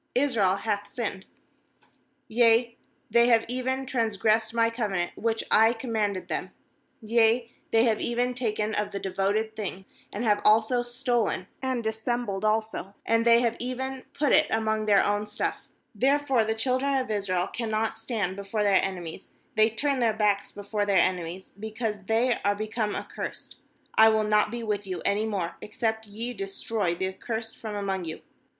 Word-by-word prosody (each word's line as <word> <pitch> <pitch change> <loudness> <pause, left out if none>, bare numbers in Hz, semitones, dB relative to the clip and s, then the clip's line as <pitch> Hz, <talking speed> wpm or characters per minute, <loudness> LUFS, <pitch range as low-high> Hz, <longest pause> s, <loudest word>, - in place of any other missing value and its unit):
"Israel 235 -8 +3
hath 205 0 -3
sinned; 200 -6 -4 1.0
yea, 235 +1 +3 0.4
they 235 0 +5
have 230 -2 +4
even 260 +2 -2
trans 230 -5 -1
gressed 220 +1 +2
My 230 0 +2
covenant 200 -7 -1
which 225 0 -1
I 225 +2 +6
com 235 +1 -6
manded 205 -4 -1
them; - - -3 0.5
yea, 230 +1 +3 0.2
they 225 0 +4
have 225 -3 +2
even 245 +1 0
taken 220 -3 -1
of 210 0 -1
the 200 - -4
devoted 200 +4 -1
thing; 195 -3 -5 0.3
and 210 - -4
have 210 -3 +2
also 220 +3 +4
stolen, 240 -5 -1 0.2
and 260 -3 -1
dissembled 220 -2 -2
also, 215 -2 -1
and 230 0 +2
they 235 0 +6
have 235 -1 +1
even 260 +2 -4
put 295 -1 +1
it 310 - +5
among 220 -1 0
their 200 -2 +5
own 205 +1 0
stuff, - - -3 0.3
therefore 270 +1 +2
the 220 0 0
children 260 +4 +1
of 255 -4 -2
Israel 190 -4 0
cannot 220 -1 -2
stand 220 -4 -3
before 200 +2 -2
their 200 -2 +4
enemies, 180 -2 -5 0.2
they 220 -1 +4
turn 275 +4 -1
their 230 -3 +3
backs 205 -2 +1
before 205 +1 -3
their 200 -1 +2
enemies, 180 0 0
because 220 -1 -4
they 235 +2 +2
are 205 0 +2
be 215 +1 -3
come 215 -1 -2
accursed; - - -6 0.4
I 220 0 +7
will 220 -1 +2
not 210 0 +3
be 235 +1 -5
with 205 -2 -2
you 185 -1 -4
any 210 +2 +1
more, 190 -6 -3
except 220 0 -2
ye 230 +4 -5
destroy 195 -2 -2
the 190 +2 -1
accursed 225 +4 -5
from 215 -2 -6
among 195 -3 -2
you. 160 - -6
220 Hz, 170 wpm, -27 LUFS, 205-235 Hz, 1.0 s, I